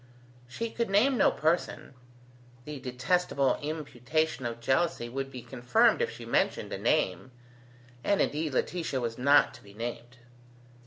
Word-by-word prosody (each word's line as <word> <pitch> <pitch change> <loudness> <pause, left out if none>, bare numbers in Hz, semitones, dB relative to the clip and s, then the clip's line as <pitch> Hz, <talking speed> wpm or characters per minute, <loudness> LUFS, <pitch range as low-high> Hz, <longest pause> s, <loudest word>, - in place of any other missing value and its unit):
She 230 - -4
could 235 -2 -2
name 225 +8 +4
no - - +5
person. 160 -2 -1 0.7
The 150 -2 -6
detestable 130 +2 0
imputation 150 -2 -2
of 115 0 -6
jealousy 130 0 0
would 135 +2 -4
be 125 -3 -9
confirmed 120 0 +2
if - - +1
she - - -9
mentioned - - 0
a - - -2
name: 95 +7 +1 0.7
and 200 - +2
indeed 150 -2 0
Laetitia 165 -5 -1
was 115 -1 -4
not 140 +3 +5
to - - -14
be 100 0 -16
named. 120 +2 -6
135 Hz, 145 wpm, -29 LUFS, 120-160 Hz, 0.7 s, no